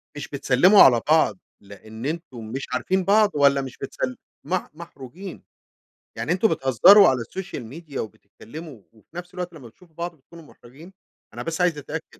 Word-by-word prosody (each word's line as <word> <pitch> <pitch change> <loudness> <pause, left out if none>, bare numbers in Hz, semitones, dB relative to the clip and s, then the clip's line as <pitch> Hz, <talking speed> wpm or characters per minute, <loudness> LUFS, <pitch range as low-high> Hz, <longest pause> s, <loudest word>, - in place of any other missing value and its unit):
مش 145 - -6
بتسلّموا 140 +8 +4
على 120 -3 +5
بعض 155 -11 +3 0.2
لأن 110 +4 -11
أنتم 145 -7 -5
مش 130 +5 -5
عارفين 185 +9 0
بعض، 205 +2 +4
والّا 140 -1 +3
مش 130 -2 -8
بتسل 130 -2 -5 0.3
مح 185 0 -3
محروجين. 170 +3 -11 0.7
يعني، - - -3
أنتم 185 +5 +3
بتهزروا 180 - +6
على 130 -1 0
السوشيال 185 +1 -7
ميديا 145 +3 -7
وبتتكلموا 115 - -11
وفي 110 +8 -25
نفس 175 0 -8
الوقت 180 -1 -6
لمّا 140 -7 -12
بتشوفوا 160 +8 -22
بعض 170 +1 -5
بتكونوا 165 +3 -16
محرجين؟ 150 +5 -16 0.4
أنا - - -6
بس 165 +1 -3
عايز 175 -4 +2
أتأكد. 145 - -8
150 Hz, 160 wpm, -23 LUFS, 125-175 Hz, 0.7 s, بتهزروا